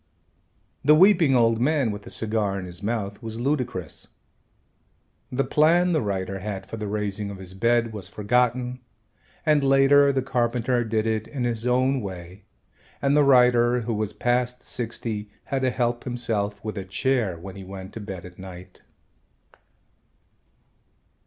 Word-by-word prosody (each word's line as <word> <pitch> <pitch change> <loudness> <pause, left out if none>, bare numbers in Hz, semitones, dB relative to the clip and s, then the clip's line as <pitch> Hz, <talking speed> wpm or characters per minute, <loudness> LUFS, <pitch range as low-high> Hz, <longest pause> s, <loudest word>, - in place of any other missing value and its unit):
The 150 +2 +6
weeping 170 -5 +5
old 115 -1 +3
man 140 -4 +2
with 105 0 -6
the - - -11
cigar 105 -3 -1
in 95 - -5
his 90 0 -6
mouth 105 -1 -3
was 115 -1 -6
ludicrous. 125 - -3 1.2
The 135 +2 +1
plan 170 +5 +3
the 160 - +2
writer 95 -2 -3
had 100 0 -5
for 115 - -7
the 105 -1 -4
raising 105 0 -3
of 100 - -7
his 95 -1 -10
bed 115 +2 +1
was 100 -4 -7
forgotten 125 +4 0 0.7
and 150 -2 +3
later 135 +1 +5
the 135 -2 -1
carpenter 120 -1 0
did 110 -1 -1
it 110 -1 -1
in 135 -4 -4
his 120 -1 -1
own 130 +2 +2
way 95 0 -8 0.5
and 140 0 +2
the 150 - +5
writer, 125 -2 +4
who 115 +1 -2
was 105 -1 -2
past 125 0 -1
sixty, 110 -3 -4
had 135 -1 -2
to 130 - +2
help 120 -1 -1
himself 115 -5 -2
with 110 -2 -3
a - - -4
chair 100 0 0
when 95 +3 -9
he 100 - -8
went 95 0 -9
to - - -6
bed 95 -4 -7
at 90 0 -13
night. 90 -1 -11
115 Hz, 160 wpm, -24 LUFS, 100-125 Hz, 1.2 s, The